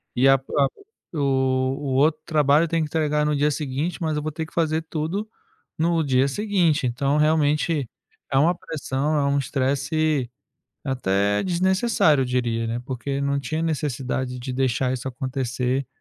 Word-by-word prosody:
e 130 Hz, +2 st, +4 dB
a 135 Hz, -, +7 dB
a 135 Hz, +1 st, +1 dB, 0.5 s
o 155 Hz, -, -3 dB
o 130 Hz, 0 st, 0 dB
outro 155 Hz, +3 st, +3 dB
trabalho 150 Hz, -1 st, +3 dB
eu -, -, -4 dB
tenho 165 Hz, 0 st, 0 dB
que -, -, -3 dB
entregar 150 Hz, -1 st, +1 dB
no 150 Hz, 0 st, +1 dB
dia 145 Hz, +1 st, +2 dB
seguinte, 150 Hz, +5 st, -3 dB
mas 160 Hz, -2 st, 0 dB
eu 150 Hz, -, -1 dB
vou 155 Hz, -, -2 dB
ter 160 Hz, +1 st, -4 dB
que -, -, -18 dB
fazer 160 Hz, -1 st, +1 dB
tudo 165 Hz, +7 st, -3 dB, 0.5 s
no 165 Hz, 0 st, +2 dB
dia 135 Hz, -1 st, +2 dB
seguinte." 170 Hz, -, +1 dB
Então 135 Hz, +4 st, 0 dB
realmente 150 Hz, -2 st, +2 dB, 0.4 s
é 135 Hz, -, +2 dB
uma 170 Hz, +5 st, +4 dB
pressão; 150 Hz, -1 st, -2 dB
é 145 Hz, -, +2 dB
um 140 Hz, 0 st, +2 dB
estresse 140 Hz, +1 st, 0 dB, 0.5 s
até 100 Hz, -6 st, 0 dB
desnecessário, 185 Hz, -, +2 dB
eu -, -, -2 dB
diria, 120 Hz, -2 st, -1 dB
né. 115 Hz, +1 st, -2 dB
Porque 135 Hz, +2 st, -4 dB
não 140 Hz, 0 st, 0 dB
tinha 155 Hz, +3 st, -3 dB
necessidade 130 Hz, -5 st, -2 dB
de 130 Hz, +2 st, -5 dB
deixar 130 Hz, 0 st, 0 dB
isso 130 Hz, +1 st, -3 dB
acontecer, 130 Hz, 0 st, -2 dB
140 Hz, 170 wpm, -23 LUFS, 130-155 Hz, 0.5 s, a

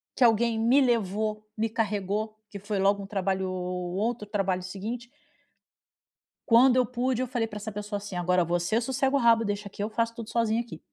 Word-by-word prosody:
que 255 Hz, -, +2 dB
alguém 230 Hz, 0 st, +4 dB
me 245 Hz, +5 st, +4 dB
levou, 215 Hz, -3 st, 0 dB
me 225 Hz, +1 st, 0 dB
carregou 215 Hz, 0 st, -2 dB
que 200 Hz, -, -7 dB
foi 205 Hz, 0 st, -3 dB
logo 200 Hz, +1 st, +2 dB
um -, -, -8 dB
trabalho 190 Hz, -1 st, -1 dB
o 180 Hz, 0 st, -3 dB
o -, -, -5 dB
outro 220 Hz, +2 st, -1 dB
trabalho 195 Hz, -3 st, -1 dB
seguinte. 220 Hz, +6 st, -6 dB, 1.4 s
Quando 245 Hz, +2 st, +6 dB
eu 255 Hz, -1 st, +4 dB
pude 250 Hz, +1 st, -1 dB
eu -, -, -3 dB
falei 240 Hz, -2 st, -1 dB
pra 210 Hz, -, -8 dB
essa 215 Hz, +1 st, -5 dB
pessoa 205 Hz, 0 st, -4 dB
assim: 200 Hz, -2 st, -7 dB
"Agora 180 Hz, 0 st, +2 dB
você 175 Hz, +6 st, +1 dB
sossega 265 Hz, +3 st, 0 dB
o -, -, +4 dB
rabo 230 Hz, -2 st, +5 dB
deixa 205 Hz, -1 st, -3 dB
aqui 200 Hz, -, -8 dB
eu 210 Hz, -, -2 dB
faço 230 Hz, +1 st, -1 dB
tudo 230 Hz, -2 st, -7 dB
sozinha 230 Hz, 0 st, +1 dB
aqui". 230 Hz, -9 st, -9 dB
215 Hz, 205 wpm, -27 LUFS, 195-235 Hz, 1.4 s, Quando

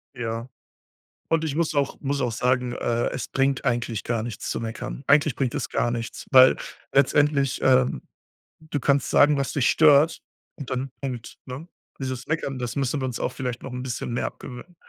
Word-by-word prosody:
Ja. 115 Hz, 0 st, -4 dB, 0.8 s
Und 165 Hz, 0 st, +1 dB
ich 150 Hz, -3 st, -2 dB
muss 165 Hz, -2 st, 0 dB
auch 140 Hz, -1 st, 0 dB
muss 140 Hz, 0 st, -1 dB
auch 125 Hz, -, 0 dB
sagen, 125 Hz, +1 st, 0 dB
äh, 120 Hz, -1 st, 0 dB
es 130 Hz, -, -4 dB
bringt 135 Hz, +1 st, 0 dB
eigentlich 120 Hz, -4 st, -1 dB
gar 115 Hz, -2 st, -1 dB
nichts 115 Hz, -2 st, -5 dB
zu -, -, -2 dB
meckern. 115 Hz, +3 st, -5 dB
Eigentlich 145 Hz, -2 st, +4 dB
bringt 130 Hz, -4 st, -1 dB
es 125 Hz, -5 st, -3 dB
gar 120 Hz, -, +1 dB
nichts, 115 Hz, 0 st, -5 dB
weil 130 Hz, 0 st, +8 dB, 0.4 s
letztendlich, 140 Hz, 0 st, +3 dB
ähm, 130 Hz, -, +3 dB, 0.6 s
du 155 Hz, -2 st, -4 dB
kannst 140 Hz, 0 st, +2 dB
sagen, 145 Hz, 0 st, +5 dB
was 140 Hz, -, -1 dB
dich 135 Hz, -4 st, +2 dB
stört 155 Hz, 0 st, +5 dB, 0.3 s
und 140 Hz, -4 st, -8 dB
dann 130 Hz, +1 st, -2 dB
Punkt, 125 Hz, -4 st, -6 dB
ne? 130 Hz, +7 st, -8 dB, 0.3 s
Dieses 130 Hz, -1 st, -4 dB
Meckern, 150 Hz, -4 st, -2 dB
das 125 Hz, -2 st, -4 dB
müssen 140 Hz, 0 st, 0 dB
wir -, -, -1 dB
uns 125 Hz, -2 st, -4 dB
auch -, -, -1 dB
vielleicht 125 Hz, -2 st, -4 dB
noch 135 Hz, -, -7 dB
'n 125 Hz, 0 st, -5 dB
bisschen 125 Hz, -1 st, -4 dB
mehr 120 Hz, -, -1 dB
abgewöhnen. 130 Hz, +7 st, -8 dB
130 Hz, 190 wpm, -24 LUFS, 120-140 Hz, 0.8 s, weil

